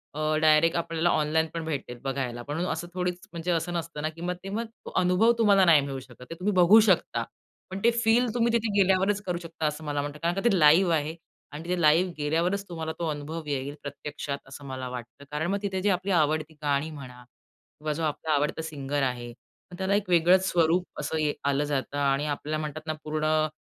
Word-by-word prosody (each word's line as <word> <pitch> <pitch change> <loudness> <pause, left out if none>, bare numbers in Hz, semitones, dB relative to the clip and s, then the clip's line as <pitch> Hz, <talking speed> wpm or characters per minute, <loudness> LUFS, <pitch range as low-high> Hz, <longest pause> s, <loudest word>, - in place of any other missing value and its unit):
अ, - - -5 0.2
direct 155 +1 +5
आपल्याला 165 0 0
online 155 +1 +1
पण 165 - -3
भेटेल 135 -5 -4
बघायला. 130 -3 -3
पण 145 +5 -4
असं 175 - -4
थोडीच 180 -1 -2
म्हणजे 170 +1 -3
असं 170 +1 -1
नसतं 165 -3 -4
ना 155 - -1
की 165 +1 -12
मग 180 +1 -1
ते 195 - -6
मग 225 +4 -2 0.2
तो - - -7
अनुभव 185 +6 +4
तुम्हाला 200 -4 +5
नाही 160 -4 +6
मिळू 140 -1 -4
शकत. 125 -1 -15
ते 165 - -6
तुम्ही 200 +3 0
बघू 185 +4 +7
शकता. 185 - +2 0.5
पण 190 +1 -5
ते 235 - +5
फील 235 +3 +4
तुम्ही 235 -1 +2
तिथे 225 -2 +1
गेल्यावरच 195 +2 +3
करू 175 -2 -1
शकता, 165 -1 -5
असं 150 +1 -4
मला 145 -1 -1
म्हणतात. 145 +1 -6
कारण 170 +1 +1
का 195 - -1
ते 190 -5 +2
लाईव्ह 165 +4 +6
आहे 155 +1 -2 0.4
आणि 150 +2 -7
तिथे 180 +1 -2
लाईव्ह 165 +4 +4
गेल्यावरच 165 +6 0
तुम्हाला 160 -2 -4
तो 170 - -1
अनुभव 155 +2 -5
येईल 140 0 -3
प्रत्यक्षात, 145 0 -5
असं 140 +1 -10
मला 130 -1 -5
वाटतं. 125 +2 -9
कारण 150 +3 -1
मग 200 0 -1
तिथे 190 -2 -2
जी 205 - +2
आपली 195 +2 -4
आवडती 155 -2 +1
गाणी 145 +1 0
म्हणा, 125 -4 -10 0.6
किंवा 150 0 -2
जो 165 - -4
आपला 155 +1 -2
आवडता 150 +2 0
सिंगर 145 -3 -3
आहे, 125 -2 -2 0.4
मग 175 - -9
त्याला 190 +1 +1
एक 205 -2 -1
वेगळंच 180 +2 +5
स्वरूप 170 +1 +2
असं 160 - -2
ये 150 -1 +1 0.2
आलं 140 +2 +1
जातं 140 +1 -2
आणि 140 0 +1
आपल्याला 150 +1 -2
म्हणतात 155 +1 -6
ना 155 - 0
पूर्ण 155 0 +1
160 Hz, 215 wpm, -27 LUFS, 145-180 Hz, 0.6 s, बघू